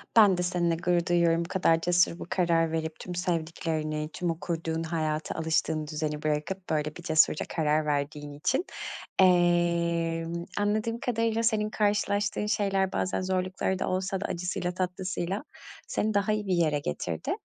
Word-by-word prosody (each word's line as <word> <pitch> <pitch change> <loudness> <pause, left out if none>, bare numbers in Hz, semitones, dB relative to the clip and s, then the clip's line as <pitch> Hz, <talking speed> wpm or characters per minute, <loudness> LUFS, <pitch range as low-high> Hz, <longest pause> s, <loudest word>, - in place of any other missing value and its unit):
Ben 205 -5 +7
de 180 - 0
seninle 175 -2 +1
gurur 175 0 +1
duyuyorum, 170 -1 +3
bu - - -8
kadar 165 -4 +3
cesur 175 0 +2
bir - - -5
karar 170 -2 +1
verip, 160 -1 -3
tüm 180 - -6
sevdiklerini, 160 -3 -2
tüm 175 - -2
o 165 - -5
kurduğun 165 -1 -2
hayatı, 155 -1 -2
alıştığın 160 -1 0
düzeni, 150 -1 -3
bırakıp 155 +5 -2
böyle 150 -1 -1
bir 175 - -10
cesurca 160 -1 +3
karar 155 -1 +1
verdiğin 145 0 -2
için, 255 - 0 0.5
emm, 170 -2 +2
anladığım 215 +3 0
kadarıyla 230 -2 0
senin 215 -2 +2
karşılaştığın 205 -1 +1
şeyler 195 -3 +1
bazen 185 - -1
zorlukları 185 0 -1
da - - -1
olsa 185 +1 -1
da - - -2
acısıyla 180 0 -2
tatlısıyla 185 +2 -2 0.4
seni 215 0 0
daha 205 +1 +2
iyi 210 -1 -2
bir 185 - +2
yere 155 -4 +2
getirdi. 80 - -3
175 Hz, 155 wpm, -28 LUFS, 160-190 Hz, 0.5 s, Ben